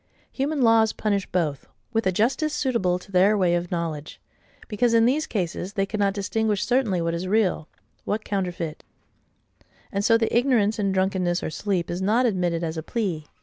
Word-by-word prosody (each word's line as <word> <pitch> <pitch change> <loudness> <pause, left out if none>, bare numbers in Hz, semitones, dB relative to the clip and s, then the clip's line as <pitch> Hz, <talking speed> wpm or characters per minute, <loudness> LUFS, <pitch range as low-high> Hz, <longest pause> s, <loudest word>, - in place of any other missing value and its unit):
Human 280 0 -1
laws 225 -1 +4
punish 200 -3 -1
both, 155 -6 -2 0.3
with 225 -2 +1
a - - +3
justice 265 - 0
suitable 215 -10 +1
to 190 +2 -14
THEIR 195 +3 +4
way 180 -3 +2
of 175 0 -1
knowledge;—because, 170 +7 -3
in 230 0 +5
these 290 +6 +1
cases, 185 -1 -3
they 195 -2 0
cannot 200 -1 0
distinguish 210 0 -1
certainly 240 -8 +1
what 165 0 -1
is 170 +2 -3
real, 190 -6 +1 0.4
what 215 +1 -3
counterfeit: 180 -5 -3 1.1
and 200 0 -1
so 230 +1 +5
the 225 0 -1
ignorance 235 -4 +2
in 200 -1 +1
drunkenness 185 -2 0
or - - -3
sleep 180 -2 -2
is 175 +2 -3
not 220 +6 +2
admitted 175 -6 0
as 160 0 -3
a - - -2
plea. 170 -5 -3
195 Hz, 175 wpm, -24 LUFS, 175-225 Hz, 1.1 s, in